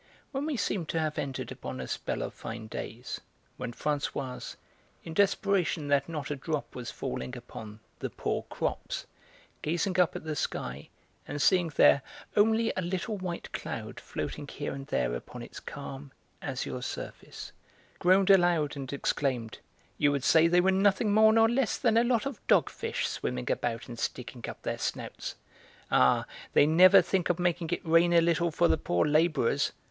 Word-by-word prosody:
When 275 +2 -2
we 300 -4 -1
seemed 190 -5 -1
to 165 - 0
have 155 -1 -1
entered 135 -2 -4
upon 65 0 -6
a 65 - -5
spell - - -3
of - - -5
fine 110 0 -7
days, 115 +2 -6 0.4
when - - -4
Françoise, 140 -1 -3 0.5
in 165 - -7
desperation 195 -5 +1
that 140 +1 +2
not 150 -3 -4
a - - 0
drop 150 +2 -3
was 120 -2 -6
falling 65 0 -5
upon 110 0 -10 0.2
the - - -3
'poor - - -2
crops,' - - -3 0.6
gazing 175 +4 0
up 180 - +3
at - - -5
the 155 -1 -3
sky 65 - -4 0.4
and 145 - -4
seeing 180 +3 +4
there 140 - +6 0.3
only 220 +2 +3
a 185 - -1
little 185 +4 -2
white 185 -3 -5
cloud - - -5
floating 145 - -5
here 145 +1 -4
and 135 0 -7
there - - 0
upon - - -7
its - - -9
calm, 140 -1 -8 0.3
azure 130 -2 -4
surface, - - -7 0.5
groaned 190 +2 +5
aloud 175 -6 +4
and 135 -2 -6
exclaimed: 130 -5 -1 0.4
"You 145 -1 +4
would 140 -2 -1
say 160 +2 +6
they 175 +1 +4
were 190 +1 +3
nothing 200 +2 +3
more 220 +1 +7
nor 225 0 +5
less 240 0 +1
than 230 -4 +2
a 230 - +5
lot 240 -1 +1
of 275 -6 -5
dogfish - - +1
swimming 60 0 -3
about 115 -1 -2
and 120 -2 -8
sticking 120 0 -4
up - - -9
their - - -2
snouts! - - -4 0.6
Ah, 65 - +4 0.3
they - - +6
never 175 +4 +7
think 180 0 0
of 175 - +2
making 175 -2 0
it 175 - -2
rain 165 +1 +4
a 170 - +7
little 170 +1 +2
for 170 +2 +3
the 160 - +2
poor 85 -9 +1
labourers! 150 -3 +2
160 Hz, 175 wpm, -29 LUFS, 135-185 Hz, 0.6 s, more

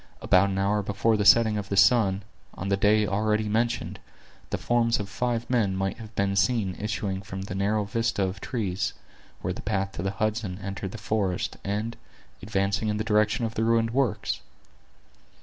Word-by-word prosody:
About 95 +2 +4
an 95 - -2
hour 100 +2 +1
before 105 +3 +1
the 105 - +1
setting 110 -1 +6
of 100 0 -7
the 100 - -1
sun, 100 -4 +4 0.3
on 95 - -4
the 100 - +3
day 105 +2 +3
already 105 +1 0
mentioned, 115 +3 -1 0.5
the - - -1
forms 115 -1 +1
of 100 - -4
five 120 +3 -2
men 110 -7 +1
might 95 +3 -2
have 110 -1 -10
been 100 0 +1
seen 100 0 +1
issuing 105 -2 -2
from 95 -1 -6
the 95 - -6
narrow 105 +2 +1
vista 110 0 0
of 95 +1 -3
trees, 100 -7 -2 0.5
where - - -2
the - - -7
path 95 -2 -1
to 85 - -6
the 95 - -1
Hudson 105 -1 -2
entered 95 -1 -5
the - - -5
forest, 100 -4 -1
and 105 +4 -3 0.4
advancing 100 +1 0
in 105 0 0
the 105 - -1
direction 105 +1 +2
of 115 - -3
the 110 - -1
ruined 115 0 +2
works. 130 -4 0
105 Hz, 185 wpm, -26 LUFS, 95-110 Hz, 0.5 s, setting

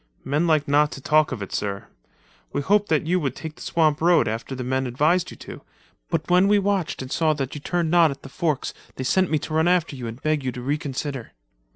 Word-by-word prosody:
"Men 150 +5 0
like 155 -3 +2
not 150 +1 +3
to - - -7
talk 155 +2 +3
of 115 -6 -4
it, 95 - -8
sir. 100 -1 -3 0.7
We 145 - -1
hoped 205 +3 +2
that 155 -1 +2
you 180 +3 +2
would 135 -5 -2
take 160 -1 -7
the - - -16
swamp 155 -2 +1
road 170 +1 +4
after 115 +5 -4
the 130 - -4
men 130 +1 -1
advised 155 +9 +1
you - - -11
to, - - -10 0.5
but 160 -3 -1
when 180 +2 +4
we 205 0 +5
watched 195 -8 -1
and 130 - -9
saw 160 -2 +2
that 135 -2 -4
you 150 - -7
turned 170 0 -1
not 170 -2 +6
at 140 -1 -7
the - - -8
forks, 155 0 -2 0.2
they 130 - -4
sent 185 +8 +2
me 155 - +2
to 155 - -6
run 160 +2 +3
after 175 -4 +2
you 125 -3 -6
and 115 +2 -7
beg 155 -1 0
you 130 - -1
to 125 - -7
reconsider." 140 -2 -3
150 Hz, 245 wpm, -23 LUFS, 135-170 Hz, 0.7 s, not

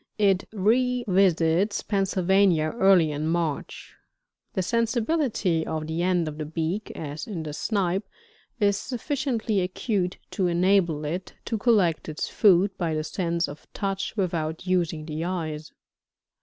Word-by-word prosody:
It 195 -2 +2
revisits 200 -5 +2
Pennsylvania 190 -4 +2
early 185 -5 +5
in 150 +1 -2
March. 165 -3 -2 0.6
The 190 - 0
sensibility 230 - 0
of 155 -1 -3
the 160 +2 -2
end 175 -2 +1
of 150 0 -6
the 155 - -3
beak, 165 +6 -3
as 150 -1 -6
in 180 -7 -4
the 150 -1 -6
Snipe, 190 +1 -1 0.5
is 200 -2 +3
sufficiently 245 -4 -1
acute 185 0 -1
to 190 -4 0
enable 175 -3 +2
it 175 +5 -4
to 230 - -2
collect 200 -10 +2
its 155 - -3
food 195 -1 +4
by 165 -3 0
the 155 - -1
sense 170 +1 -1
of 145 +1 -11
touch 195 +2 -3
without 165 -4 -2
using 170 -4 0
the 155 0 -4
eyes. 160 -4 -4
180 Hz, 135 wpm, -26 LUFS, 160-200 Hz, 0.6 s, early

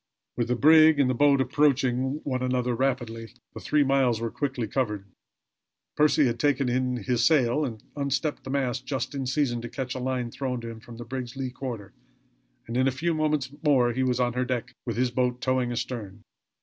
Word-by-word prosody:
With 120 -1 -1
the 125 - +1
brig 155 +3 +6
and 140 - +4
the - - 0
boat 140 +2 +4
approaching 130 0 +1
one 130 -2 -2
another 125 -1 0
rapidly, 120 -3 -2 0.2
the - - -7
three 150 -1 +2
miles 135 -4 +2
were 115 -1 -3
quickly 135 -5 -2
covered. 105 -4 -2 0.9
Percy 150 -1 +4
had 120 -2 -1
taken 140 -2 +2
in 125 0 0
his 120 +2 +1
sail, 135 +1 +3
and 115 -6 -5
unstepped 140 +1 -1
his 130 - -6
mast 130 -2 -1
just 135 0 -3
in 135 -2 -3
season 130 -3 0
to 120 - -6
catch 130 +1 -4
a - - -5
line 125 -2 -2
thrown 130 -1 -3
to 115 - -6
him 115 -1 -8
from 115 0 -12
the 120 - -8
brig's 125 0 -5
lee 130 -1 -4
quarter; 120 -7 -6 0.7
and 115 +2 -4
in 130 +1 +3
a - - +2
few 165 +6 -1
moments 150 -4 0
more 130 -6 +3
he 130 - -1
was 125 -1 +1
on 120 -1 +1
her 125 +1 0
deck, 125 -2 -3
with 115 -2 -2
his 125 0 +1
boat 125 0 0
towing 130 -1 0
astern. 110 -4 -5
130 Hz, 205 wpm, -26 LUFS, 120-135 Hz, 0.9 s, brig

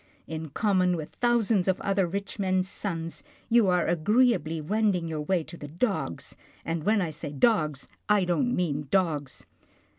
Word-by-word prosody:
In 160 -1 -6
common 185 +1 +2
with 155 -2 -6
thousands 230 -5 +1
of 190 - +1
other 195 -2 +1
rich 200 +4 -5
men's 185 -1 +1
sons, 165 -4 -4 0.3
you 235 -3 +5
are 180 -2 +2
agreeably 175 - +2
wending 195 +1 0
your 155 -2 -3
way 170 +2 0
to 170 - -11
the 145 - -8
dogs, 170 - -2 0.3
and 165 -1 -2
when 210 0 +2
I 165 - -3
say 150 -1 -6
dogs, 150 - +1 0.2
I 205 -3 +4
don't 245 +8 +1
mean 150 -5 -1
dogs." 155 -8 -1
180 Hz, 160 wpm, -27 LUFS, 160-205 Hz, 0.3 s, you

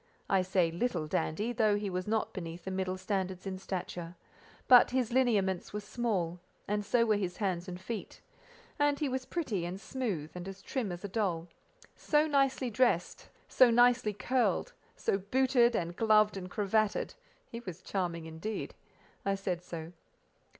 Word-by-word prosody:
I 195 -1 +5
say 185 -2 +2
little 175 -2 -1
dandy, 205 +9 -1
though 215 -3 +3
he 205 0 -2
was 185 0 -3
not 220 0 0
beneath 170 -2 -6
the 190 - -3
middle 185 0 -2
standard 190 -1 -2
in 190 -1 -4
stature; 180 -2 -5 0.5
but 250 -1 +8
his 250 -2 0
lineaments 205 -9 +2
were 210 - -2
small, 200 -5 -2 0.3
and 210 +1 0
so 230 +3 +3
were 215 -2 +3
his 185 -3 -3
hands 185 -3 -1
and 180 -1 -6
feet; 215 +4 -6 0.6
and 290 0 +3
he 300 - 0
was 260 -1 -2
pretty 235 - -2
and 175 +2 -4
smooth, 200 - -3
and 180 +1 -7
as 195 0 -8
trim 240 -8 -2
as 175 +2 -7
a - - -2
doll: 185 -5 -1 0.5
so 300 0 +2
nicely 275 -4 +1
dressed, 210 -7 +1 0.2
so 255 -2 +6
nicely 240 -1 +4
curled, 255 - 0 0.2
so 195 - 0
booted 245 +3 +3
and 175 -2 -2
gloved 215 -1 +4
and 185 -1 -6
cravated—he 215 - -2
was 185 -6 -8
charming 170 -4 -2
indeed. 160 +7 -5 0.5
I 195 0 +1
said 185 -3 -2
so. 170 -1 -7
200 Hz, 165 wpm, -31 LUFS, 180-235 Hz, 0.6 s, but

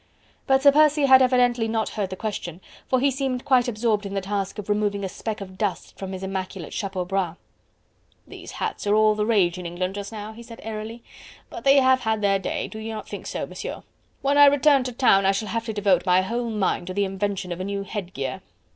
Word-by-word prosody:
But 265 -1 +3
Sir 285 - +8
Percy 300 0 +4
had 265 -1 +7
evidently 245 -2 +3
not 220 0 -1
heard 205 -3 -3
the 190 - -5
question, 185 -5 -5 0.3
for 260 - +2
he 275 +2 +3
seemed 265 -1 -2
quite 255 -3 +3
absorbed 215 -2 0
in 200 0 -5
the - - +1
task 195 +1 -3
of 210 - -6
removing 205 -1 0
a - - -1
speck 215 +3 -5
of 190 -1 -9
dust 205 -4 -3
from 195 -1 -6
his 190 0 -6
immaculate 190 -3 -5
chapeau 190 -3 -3
bras. 185 -2 -2 0.9
"These - - -11
hats - - -4
are 205 - +4
all 215 0 +5
the 210 0 -1
rage 185 -6 +2
in 180 - -5
England 180 +2 -3
just 200 +1 -6
now," 215 0 -7
he 230 - -11
said 230 -1 -11
airily, 225 +1 -6 0.5
"but 350 - -8
they 275 0 +6
have 260 -1 +5
had 220 -3 -1
their 195 -1 +3
day, 190 - -3
do 220 - -9
you 220 +1 -5
not 220 - -6
think - - -7
so, - - -3
Monsieur? - - -7 0.4
When 280 +1 +3
I 290 - +10
return 280 -1 +4
to 255 - -3
town, 195 -6 +4
I 195 - +4
shall 210 +2 -3
have 230 0 -2
to 225 - -3
devote 200 -2 +2
my 180 +1 +5
whole 235 +4 -2
mind 210 -4 -1
to 185 - -5
the 200 0 +2
invention 195 -1 -3
of 175 - -4
a - - -3
new 200 0 -3
headgear..." 175 -10 -5
210 Hz, 235 wpm, -24 LUFS, 195-240 Hz, 0.9 s, I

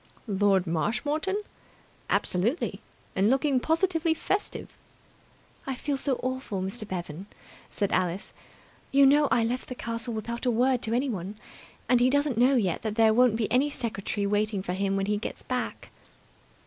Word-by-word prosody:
"Lord 200 -3 +2
Marshmoreton!" 290 - -1 0.7
"Absolutely! 220 - 0 0.3
And 195 +2 +3
looking 270 +1 +2
positively 325 +2 +1
festive." 395 +5 -3 0.9
"I 265 - -1
feel 285 +3 -2
so 270 -1 -1
awful, 255 -6 -3
Mr. 205 +3 -4
Bevan," 175 -1 -5 0.4
said 200 - -1
Alice. 185 +1 -1 0.6
"You 275 0 +6
know, 290 +2 +5
I 230 0 +3
left 245 +3 -2
the 255 - -5
castle 230 -1 -4
without 235 +3 -4
a - - +5
word 245 +1 +2
to 225 - -2
anyone, 215 -7 -1 0.5
and 245 +1 +4
he 250 +1 +4
doesn't 285 -1 +1
know 260 +3 +5
yet 190 -9 +1
that 215 -2 -3
there 220 -1 +5
won't 245 -1 +4
be 225 -2 -1
any 265 +4 +3
secretary 215 -6 -3
waiting 205 -1 0
for 180 - -3
him 195 +1 0
when 195 0 0
he 210 +1 0
gets 210 - -6
back." 250 -1 -4
235 Hz, 160 wpm, -27 LUFS, 200-265 Hz, 0.9 s, You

